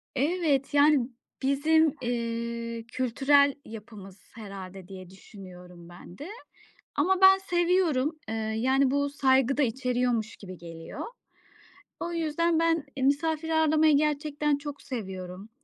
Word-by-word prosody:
Evet, 290 -1 0
yani, 285 -3 +4 0.3
bizim, 300 +3 +3
eee, 235 -1 -3
kültürel 275 +3 +3
yapımız 210 -3 -11 0.2
herhâlde, 195 -4 -9
diye 185 -2 -10
düşünüyorum 180 -3 -13
ben 175 0 -13
de. 295 - -8 0.7
Ama 365 +6 +2
ben 385 0 +8
seviyorum. 345 -5 +1
Eee, - - -3 0.2
yani 260 +3 +2
bu 285 0 +1
saygı 270 -1 +2
da 295 - +3
içeriyormuş 245 -2 -1
gibi 185 -2 -10
geliyor. 165 -1 -9 1.0
O 345 0 -4
yüzden 330 0 0
ben 330 -2 +1
i 260 - -2
misafir 315 +3 +1
ağırlamayı 315 -1 +4
gerçekten 295 0 0
çok 285 0 -8
seviyorum. 190 -4 -7
270 Hz, 120 wpm, -27 LUFS, 220-305 Hz, 1.0 s, ben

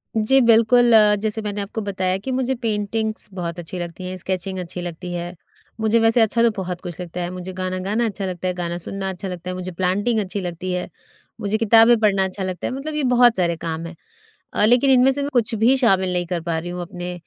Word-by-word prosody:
जी 225 +5 +4
बिल्कुल, 235 +1 +5 0.3
जैसे 220 0 -2
मैंने 205 -1 -3
आपको 210 +2 -5
बताया 190 -2 -1
कि 260 +7 -5
मुझे 260 0 0
पेंटिंग्स 220 -1 -2
बहुत 175 -2 -4
अच्छी 175 +2 -6
लगती 175 +1 -6
हैं, 185 - -6
स्केचिंग 185 +1 -4
अच्छी 180 0 -6
लगती 175 +1 -6
है, 175 +1 -5 0.5
मुझे 220 +1 +3
वैसे 225 +1 +4
अच्छा 225 +2 +2
तो 235 - +5
बहुत 180 -2 -4
कुछ 175 -2 -7
लगता 175 0 -6
है, 175 - -2
मुझे 185 0 -7
गाना 185 0 -3
गाना 225 +3 +1
अच्छा 200 -2 -3
लगता 185 0 -4
है, 180 - 0
गाना 175 -1 -3
सुनना 190 +2 -5
अच्छा 190 +1 -6
लगता 180 0 -6
है, - - -3
मुझे 185 0 -5
प्लांटिंग 195 +6 0
अच्छी 200 0 -3
लगती 180 +1 -4
है, 180 - -2 0.5
मुझे 205 +2 0
किताबें 225 +1 +6
पढ़ना 200 -3 +3
अच्छा 190 +1 -5
लगता 185 -1 -3
है, - - -4
मतलब 295 +3 -5
ये 300 - -1
बहुत 245 -1 +5
सारे 170 -2 +1
काम 165 0 -4
हैं 170 0 -8 0.6
अ, 210 - +3
लेकिन 245 +4 +4
इनमें 260 +1 +5
से 285 +1 -2
मैं 285 - -2
कुछ 240 0 +1
भी 235 +5 +4
शामिल 190 -7 +2
नहीं 175 0 -1
कर 175 -2 -2
पा 165 -1 -2
रही 175 +2 -6
हूँ 180 0 -5
अपने 180 0 -6
190 Hz, 235 wpm, -21 LUFS, 180-225 Hz, 0.6 s, किताबें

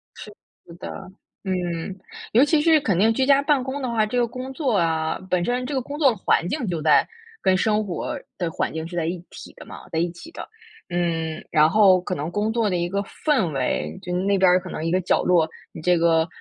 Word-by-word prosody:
是 210 - -10 0.5
的， - - -6 0.5
嗯。 180 -1 -3 0.4
尤 240 +5 +6
其 295 +1 +3
是 320 0 +5
肯 200 -10 0
定 225 +2 +4
居 260 - +1
家 280 0 +5
办 285 -3 +2
公 270 +2 -4
的 255 - -2
话， 225 -2 +1
这 230 +4 -3
个 240 - +2
工 255 +3 -7
作 260 -8 0
啊 160 -2 0
本 180 -1 +1
身 250 +1 -1
这 285 - -4
个 260 - 0
工 285 +4 -7
作 280 -4 +5
的 225 - -6
环 175 - +1
境 250 - -2
就 170 -3 -2
在 150 -2 +4 0.3
跟 185 0 +3
生 215 +1 +1
活 180 -4 -4 0.2
的 175 -2 -2
环 - - -2
境 160 0 -4
是 175 - -9
在 170 - -1
一 175 +2 -3
体 - - -11
的 - - -12
嘛， - - -11
在 160 - -1
一 170 +1 0
起 180 - -12
的。 - - -8 0.4
嗯， 165 -2 -2
然 155 0 +5
后 190 -2 +5
可 180 - -3
能 155 +4 -4
工 210 +3 -1
作 225 -2 +1
的 185 - -1
一 175 0 -1
个 200 +2 -1
氛 230 - 0
围。 80 - -2
就 180 - -5
是 180 - 0
那 200 0 +2
边 190 -1 +5
儿 180 +1 +5
可 185 - -10
能 - - -5
一 165 - -1
个 185 - +2
角 - - +1
落， 175 -3 +3 0.2
你 160 - -9
这 180 +1 +3
个， 165 -1 +3
185 Hz, 265 characters per minute, -23 LUFS, 170-240 Hz, 0.5 s, 尤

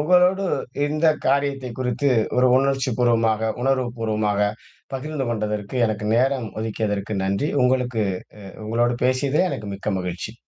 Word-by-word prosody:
உங்களோடு 180 +4 +4 0.4
இந்த 155 +2 +1 0.2
காரியத்தை 140 -1 +1
குறித்து 130 +2 0 0.3
ஒரு 125 - +5
உணர்ச்சிப்பூர்வமாக, 120 -5 +2
உணர்வுப்பூர்வமாக 115 -5 0 0.4
பகிர்ந்துகொண்டதற்கு, 120 -7 -3
எனக்கு 105 -1 -3
நேரம் 130 -1 +1
ஒதுக்கியதற்கு 105 -2 -2
நன்றி! 100 +10 0
உங்களுக்கு 125 -3 +1 0.5
அ - - -15
உங்களோடு 120 +2 +1
பேசியதிலே 140 +7 +2
எனக்கு 105 -1 -5
மிக்க 100 +2 -3
மகிழ்ச்சி. 90 +4 -5
120 Hz, 110 wpm, -23 LUFS, 110-135 Hz, 0.5 s, ஒரு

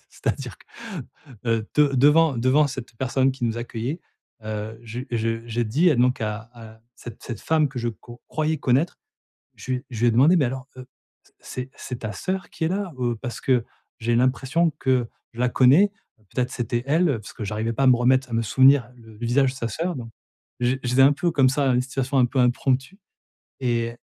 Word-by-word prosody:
c'est-à-dire - - -4
que, - - -21 0.8
heu, 115 -1 +1
de 150 -1 +5
devant 145 +2 +5
devant 130 +5 +3
cette 130 -3 -7
personne 130 0 +1
qui 130 -2 -5
nous 115 0 -1
accueillait, 120 +7 -4 0.4
heu, 110 +1 -5
je 115 +2 -6
je 115 0 -2
j'ai 120 +1 -1
dit 155 +11 +3
à 140 - +2
donc 125 0 +2
à 110 +1 -4
à 110 -1 -13
cette 120 -2 -11
cette 120 - -6
femme 155 -2 +2
que 130 -1 -7
je 120 0 -1
co 120 +1 -10
croyais 155 0 -1
connaître. 135 +7 +1 0.6
Je 130 - -5
lui 130 +2 -2
je 115 - -6
lui 120 - +3
ai - - +5
demandé: 145 +10 +5
«Mais 150 - +3
alors, 130 +2 -5
heu, 130 0 -10 0.5
c'est 130 +1 -7
c'est 125 -1 -7
ta 105 -2 -4
soeur 185 - -4
qui 160 - -4
est - - +2
là? 190 -2 -2
Heu, 120 -2 0
parce 120 -3 -6
que 125 -3 +2 0.4
j'ai 115 +1 0
l'impression 135 +6 +2
que 130 -3 +1 0.3
je 120 - -7
la 125 - +3
connais, 140 - +5 0.4
peut-être 125 -1 -1
c'était 120 0 -2
elle?» 165 +5 +3
parce 105 - -11
que 110 - -6
j'arrivais 110 +3 -2
pas 135 - -1
à - - +4
me 125 - +6
remettre, 130 +1 +2
à - - -8
me 115 - +1
souvenir 130 +1 +4
du 110 -2 -15
visage 125 +3 +2
de - - -12
sa 115 -2 -3
soeur, 170 +8 -3
donc 115 -2 -7 0.5
j 125 +2 +1
j'étais 125 +2 +4
un 140 +2 +7
peu 170 +5 0
comme 135 -4 +4
ça 140 +1 0
dans 125 - +3
une 125 - +2
situation 135 +1 -3
un 125 - +5
peu 130 +2 -3
impromptue 130 +8 +1 0.6
et 115 -1 -1
125 Hz, 210 wpm, -24 LUFS, 115-140 Hz, 0.8 s, un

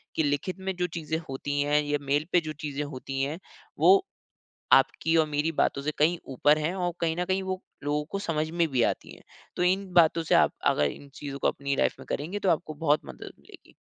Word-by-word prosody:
कि 160 - +2
लिखित 145 +6 -1
में 190 0 -3
जो 180 0 -1
चीज़ें 160 0 -2
होती 145 +2 -2
हैं 145 +1 +2
या 145 0 0
मेल 145 +2 0
पे 180 - +5
जो - - -3
चीज़ें 145 0 -3
होती 135 -1 -5
हैं 150 +5 -3 0.4
वो 390 +1 +7 0.7
आपकी 165 0 +4
और 160 - +4
मेरी 150 +2 0
बातों 140 -2 0
से 150 - 0
कहीं 165 +4 +3 0.2
ऊपर 145 +4 +4
है 155 +4 -1
और 180 -2 -1
कहीं 165 -1 +1
न 180 - 0
कहीं 190 +1 0
वो 185 0 -3 0.2
लोगों 150 +1 0
को 200 - -2
समझ 155 -4 -1
में 170 0 +1
भी 125 -2 +2
आती - - -2
है। - - -17 0.3
तो - - 0
इन 190 +2 +2
बातों 165 -1 +5
से - - +2
आप - - +4 0.2
अगर 75 - +1
इन 140 - -12
चीज़ों 140 -1 -6
को - - +2
अपनी 140 0 -1
लाइफ - - +1
में - - -10
करेंगे 175 +8 -3
तो 195 - +1
आपको 155 -1 0
बहुत 150 -1 +1
मदद - - -9
मिलेगी। - - -17
155 Hz, 230 wpm, -27 LUFS, 145-175 Hz, 0.7 s, वो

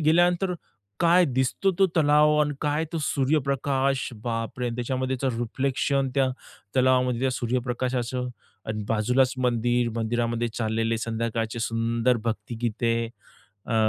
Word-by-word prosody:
गेल्यानंतर 175 +4 +3 0.5
काय 175 +2 +5
दिसतो, 130 +6 +1
तो 195 - +6
तलाव, 150 -1 +5
आणि 150 -1 +1
काय 150 +2 +1
तो 165 - -1
सूर्यप्रकाश, 135 -1 +1 0.2
बापरे! 115 +1 -2
त्याच्यामध्येचं 130 +1 -1
रिफ्लेक्शन 135 +3 0
त्या 135 -1 +3 0.5
तलावामध्ये, 125 -1 +3
त्या 135 - +2
सूर्यप्रकाशाचं. 125 0 -2 0.4
आणि 110 -1 -3
बाजूलाच 125 +4 +2
मंदिर, 120 -1 +1
मंदिरामध्ये 115 +1 0
चाललेले 115 0 0
संध्याकाळचे 115 0 -2
सुंदर 115 +2 +1
भक्तिगीते, 115 +1 -1 0.7
अ, 115 - -2
125 Hz, 110 wpm, -26 LUFS, 115-135 Hz, 0.7 s, तो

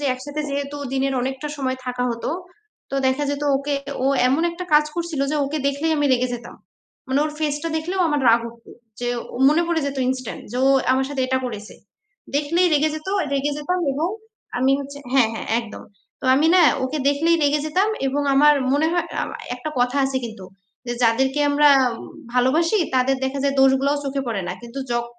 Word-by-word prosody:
যে 290 - -4
একসাথে 290 +4 -6
যেহেতু 280 +1 -3 0.2
দিনের 270 0 0
অনেকটা 265 +3 -3
সময় 260 -2 -2
থাকা 250 0 -2
হতো, 235 0 -3 0.6
তো 275 - -2
দেখা 265 +3 +1
যেত 285 0 -3
ওকে 280 +1 -2 0.3
ও - - +3 0.2
এমন 285 +6 +1
একটা 350 +2 -6
কাজ 300 0 +6
করছিল 340 -4 -3
যে 305 - 0
ওকে 290 +3 -3
দেখলেই 300 +3 -1
আমি 290 -1 +2
রেগে 250 0 +1
যেতাম। 240 0 -9 0.5
মানে 265 +2 +1
ওর 305 - -3
face-টা 300 +1 -1
দেখলেও 355 +4 -2
আমার 295 -2 0
রাগ 230 +1 +5
উঠতো, 230 0 -16 0.3
যে 245 - -1 0.3
ও - - -5
মনে 320 +3 +3
পড়ে 330 -2 +1
যেত 275 -1 -4
instant 255 -2 -4
যে 250 - -2
ও - - +5 0.2
আমার 265 0 +1
সাথে 270 -2 -1
এটা 260 0 +1
করেছে। 215 -3 -7 0.6
দেখলেই 335 +5 +2
রেগে 305 +1 +2
যেত, 310 +4 -7 0.2
রেগে 280 +1 0
যেতাম 360 +5 -1
এবং 310 +5 -1 0.5
আমি 260 +2 +3
হচ্ছে 280 +1 -8
হ্যাঁ, 260 -5 +4
হ্যাঁ - - -6
একদম। 230 -2 -10 0.4
তো - - -11
আমি 300 +4 +3
না 365 - +6 0.2
ওকে 295 +4 -3
দেখলেই 320 +4 +2
রেগে 290 +1 +2
যেতাম 375 +7 +1 0.2
এবং 285 +2 0
আমার 295 +2 +6 0.2
মনে 290 +3 +2
হয় 345 -1 0 0.2
আমা - - -7 0.2
একটা 305 +5 -5
কথা 245 +3 +1
আছে 270 0 -1
কিন্তু, 220 -4 -10 0.4
যে 240 - -1
যাদেরকে 265 +5 +2
আমরা 290 +1 +5 0.7
ভালোবাসি 315 - +3 0.2
তাদের 260 +1 +2
দেখা 270 +1 -2
যায় 280 0 +1
দোষগুলোও 270 +2 +3
চোখে 275 0 -2
পড়ে 215 -5 -2
না। - - -2
কিন্তু 235 +3 -8
যখ 235 0 0
280 Hz, 195 wpm, -22 LUFS, 260-300 Hz, 0.7 s, কাজ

